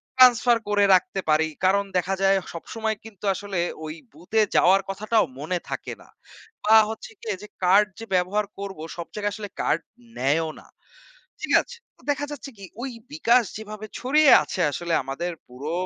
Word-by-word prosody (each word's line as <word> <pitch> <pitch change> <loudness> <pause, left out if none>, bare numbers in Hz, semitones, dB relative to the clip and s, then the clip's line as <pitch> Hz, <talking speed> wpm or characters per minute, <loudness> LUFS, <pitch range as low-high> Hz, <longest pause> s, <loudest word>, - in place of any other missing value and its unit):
transfer 245 -2 +6
করে 205 -1 +4
রাখতে 195 +2 0
পারি। 155 +1 +4 0.2
কারণ 200 +2 +4
দেখা 185 +2 0
যায়, 195 0 +5 0.2
সবসময় 220 +6 -3
কিন্তু 210 -3 -14
আসলে 200 -3 -4 0.3
ওই 155 - -6 0.2
বুথে 180 +8 0
যাওয়ার 190 +2 +5
কথাটাও 215 +3 +1
মনে 175 +5 -2
থাকে - - -4
না - - -18 0.6
বা 220 +1 +6
হচ্ছে 225 0 -7
গিয়ে 215 -4 -3
যে, 210 - -8 0.2
card 195 +4 +5
যে, 225 - -7
ব্যবহার 190 +4 +1
করব, 195 -4 -6 0.2
সব 170 - -5
জায়গায় 205 -1 -2
আসলে 205 -2 -7
card 165 - +1 0.4
নেয়ও 155 +5 +1
না। - - -17 0.7
ঠিক - - -3
আছে? 485 - -12 0.2
তো - - -23
দেখা 290 0 -3
যাচ্ছে 280 -1 -8
কি, 200 - -10 0.2
ওই 270 - -3 0.2
বিকাশ 250 -5 +3
যেভাবে 215 0 -8
ছড়িয়ে 285 +3 +5
আছে 185 - -5
আসলে 170 +6 -3
আমাদের 165 +7 -3 0.2
পুরো 140 +6 -6
200 Hz, 170 wpm, -24 LUFS, 175-225 Hz, 0.7 s, transfer